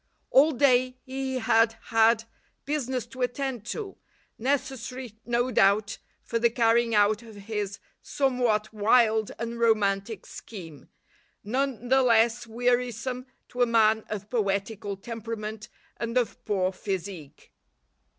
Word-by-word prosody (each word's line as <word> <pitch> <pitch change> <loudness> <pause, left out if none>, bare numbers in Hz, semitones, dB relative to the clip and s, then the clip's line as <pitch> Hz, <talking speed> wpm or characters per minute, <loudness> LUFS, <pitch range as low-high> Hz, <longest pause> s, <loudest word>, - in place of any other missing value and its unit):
All 290 +4 +6
day 255 -2 +3
he 265 0 -4
had 225 -1 +3
had 225 0 +3 0.4
business 260 -4 -2
to 255 +2 -10
attend 250 -2 -2
to, 405 - -5 0.4
necessary 255 -2 -2
no 240 +1 +1
doubt 205 0 +3 0.2
for 230 - -2
the 235 +1 +4
carrying 230 0 +2
out 210 +1 +3
of 225 -2 -13
his 205 -1 -4 0.2
somewhat 245 -6 0
wild 220 0 +3
and 235 +1 -4
romantic 210 -2 +1
scheme, 165 - -10 0.5
none 245 +1 -2
the 265 +1 +5
less 235 -1 +3
wearisome 245 +2 -1 0.2
to 250 - -4
a 245 - +5
man 220 -1 +3
of 210 -1 -5
poetical 205 -2 -2
temperament 220 0 -6 0.3
and 230 +1 -2
of 245 -2 -1
poor 190 -2 +1
physique. 185 -6 -6
230 Hz, 120 wpm, -27 LUFS, 210-250 Hz, 0.5 s, All